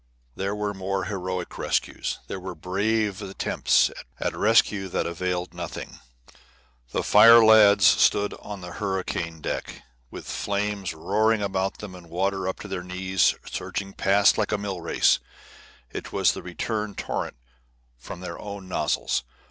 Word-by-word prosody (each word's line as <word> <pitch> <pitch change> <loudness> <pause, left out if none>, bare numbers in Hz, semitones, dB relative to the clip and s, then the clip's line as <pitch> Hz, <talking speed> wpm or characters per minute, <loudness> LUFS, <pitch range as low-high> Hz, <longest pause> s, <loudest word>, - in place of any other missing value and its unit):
There 100 +2 -2
were 105 -1 -2
more 95 0 -2
heroic 90 -2 -4
rescues. - - -1
There 95 - -6
were 95 -1 -7
brave 100 +4 -1
attempts 95 -1 +1 0.3
at - - -2
rescue 105 -2 +3
that - - -1
availed 90 +1 -3
nothing. 85 -1 -7 0.9
The - - -2
fire 115 +2 +8
lads 105 -3 +7
stood 100 +2 +4
on 100 -2 -8
the 90 0 -8
hurricane 90 -5 -3
deck, - - -5 0.3
with - - -9
flames 100 -2 -2
roaring 105 +6 +1
about 95 -1 -1
them 105 -3 -8
and 90 -2 -13
water 95 +2 -1
up 95 - -2
to - - -7
their 95 -2 -4
knees 90 +1 +1
surging 100 -1 -5
past 100 +2 +3
like 105 - 0
a 105 - +1
mill 100 -3 -4
race; - - +3 0.7
it - - -7
was - - +3
the - - -6
return 105 +3 -4
torrent - - -3 0.6
from 85 - -9
their 95 - -6
own 100 -2 -8
nozzles. 90 - 0
95 Hz, 150 wpm, -25 LUFS, 90-105 Hz, 0.9 s, fire